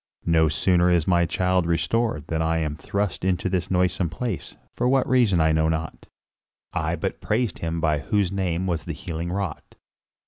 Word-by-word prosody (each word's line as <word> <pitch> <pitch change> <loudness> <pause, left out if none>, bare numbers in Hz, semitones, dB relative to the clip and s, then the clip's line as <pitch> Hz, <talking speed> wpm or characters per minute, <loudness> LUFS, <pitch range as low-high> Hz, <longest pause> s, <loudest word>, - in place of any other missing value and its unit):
No 80 -2 +4
sooner 90 +3 +3
is 85 -3 +3
my 85 -2 +3
child 90 -1 +1
restored 85 -1 0
than 80 0 -2
I 80 0 +1
am 75 -2 -1
thrust 100 +5 -2
into 90 0 0
this 90 -2 -1
noisome 90 -1 +1
place; 100 +3 -4 0.2
for 125 +1 +1
what 135 -1 +2
reason 120 -8 +3
I 80 0 +4
know 80 0 +2
not, 80 0 -4 0.7
I - - -1
but - - -4
praised 110 -2 -1
him 85 0 -2
by 80 -2 +1
whose 95 +4 0
name 95 -2 -1
was 85 -4 -2
the - - -4
healing 85 +1 -5
wrought." 95 -4 -4
85 Hz, 180 wpm, -24 LUFS, 80-95 Hz, 0.7 s, No